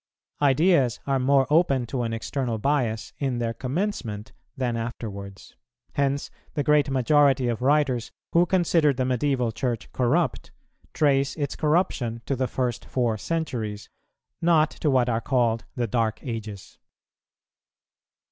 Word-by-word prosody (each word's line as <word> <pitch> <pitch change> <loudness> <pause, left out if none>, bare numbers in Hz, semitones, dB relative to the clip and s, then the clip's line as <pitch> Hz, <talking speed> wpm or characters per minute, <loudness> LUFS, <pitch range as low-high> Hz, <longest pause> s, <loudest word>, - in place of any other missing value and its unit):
Ideas 140 -3 +3
are 135 -1 +1
more 135 +1 +3
open 140 -6 +3
to 125 +1 -3
an 115 -1 -2
external 115 +1 -2
bias 120 -3 -1
in 135 -4 -1
their 115 -1 -1
commencement 125 - -3 0.3
than 125 -3 -1
afterwards; 100 -4 -6 0.4
hence 140 0 -1 0.2
the 145 - 0
great 150 -1 +3
majority 135 0 +3
of 120 0 -2
writers 135 -4 +2 0.2
who 175 +1 +4
consider 165 -5 +3
the 130 0 -1
Medieval 125 -1 0
Church 120 0 -3
corrupt, 145 +7 0 0.4
trace 140 -2 +2
its 145 -3 -3
corruption 150 -8 0
to 135 - -1
the 130 0 -1
first 125 -2 -2
four 120 -4 0
centuries, 110 -7 -4 0.5
not 160 -2 +4
to 150 - -1
what 130 -3 +3
are 115 -1 0
called 115 -3 +1
the 125 -3 0
dark 110 -1 0
ages. 110 -5 -7
130 Hz, 135 wpm, -25 LUFS, 115-145 Hz, 0.5 s, who